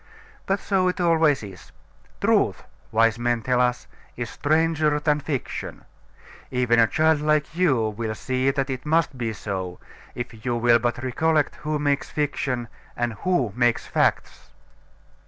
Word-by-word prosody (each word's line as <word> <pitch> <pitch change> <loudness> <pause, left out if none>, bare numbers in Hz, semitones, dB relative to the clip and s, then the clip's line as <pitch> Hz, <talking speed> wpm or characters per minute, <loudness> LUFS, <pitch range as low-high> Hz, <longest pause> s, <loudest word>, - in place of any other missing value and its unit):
But 195 +1 +1
so 190 -2 +1
it 180 - -1
always 160 -6 +3
is. 95 -3 -11 0.5
"Truth," - - +2 0.3
wise 115 0 +3
men 120 -1 0
tell 125 +1 +2
us, 125 0 0 0.3
"is 120 -2 -4
stranger 155 0 +1
than 150 -1 +1
fiction." 145 -4 -5 0.6
Even 125 -2 +2
a 115 - +6
child 160 +2 +2
like 150 +1 +1
you 135 -12 +2
will 110 +1 -4
see 130 +3 0
that 135 0 -1
it 130 -1 -5
must 160 -1 +1
be 115 -3 -2
so, 95 -4 -5 0.4
if 120 -3 -7
you 120 -2 -1
will 120 0 +4
but 120 +1 -2
recollect 155 +4 +1
who 155 0 -2
makes 145 -1 0
fiction, 135 -5 -2 0.3
and 120 -1 -1
who 135 - +1
makes 120 -1 +1
facts. - - -1
130 Hz, 150 wpm, -24 LUFS, 120-155 Hz, 0.6 s, a